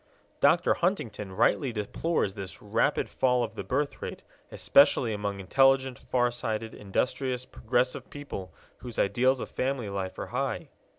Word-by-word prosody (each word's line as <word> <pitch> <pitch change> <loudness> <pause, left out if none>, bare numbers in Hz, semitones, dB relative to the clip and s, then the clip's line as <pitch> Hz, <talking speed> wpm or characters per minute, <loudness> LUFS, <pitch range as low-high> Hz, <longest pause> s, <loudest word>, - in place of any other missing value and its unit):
Dr. 160 +5 +4
Huntington 115 - -2
rightly 135 - +2
deplores 110 - -1
this 95 -2 -7
"rapid 115 +7 +1
fall 125 -2 +2
of 110 -2 -4
the - - -5
birthrate, 140 +2 -3 0.3
especially 125 -4 +4
among 100 -1 -3
intelligent, 135 +5 +3
far 125 -1 +1
sighted, 115 -2 -3
industrious, 125 +5 -2
progressive 125 +1 -1
people 120 -11 -7 0.3
whose 120 -3 -8
ideals 130 +6 +2
of - - -6
family 130 -5 -2
life 95 -1 -4
are - - -4
high." - - -2
125 Hz, 135 wpm, -28 LUFS, 105-135 Hz, 0.3 s, Dr